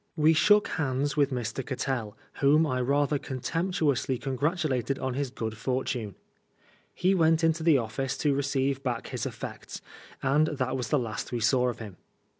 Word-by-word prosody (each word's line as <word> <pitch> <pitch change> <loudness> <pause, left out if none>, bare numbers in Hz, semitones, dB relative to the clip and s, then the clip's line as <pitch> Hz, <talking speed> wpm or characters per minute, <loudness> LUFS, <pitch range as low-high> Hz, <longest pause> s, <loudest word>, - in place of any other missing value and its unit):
We 155 0 +4
shook 210 +6 +5
hands 145 -2 -1
with 145 -2 +3
Mr. 125 0 -3
Cattell, 125 -5 -3 0.2
whom 150 +3 +5
I 130 -4 -1
rather 140 +3 +1
contemptuously 145 -1 -1
congratulated 135 -1 -1
on 130 -1 -2
his 140 +1 -2
good 110 -3 -4
fortune. 125 -3 -2 0.8
He 185 +2 +2
went 165 -2 +3
into 165 0 +2
the 160 -3 +5
office 130 +3 -2
to 145 -2 +1
receive 135 -1 0
back 125 -4 -3
his - - -3
effects, - - -7 0.4
and 145 +3 +3
that 130 -4 -2
was 125 -4 -3
the 150 - +3
last 110 -5 -4
we 120 - -1
saw 125 +3 +3
of 120 - -5
him. 105 -5 -9
135 Hz, 165 wpm, -28 LUFS, 125-150 Hz, 0.8 s, shook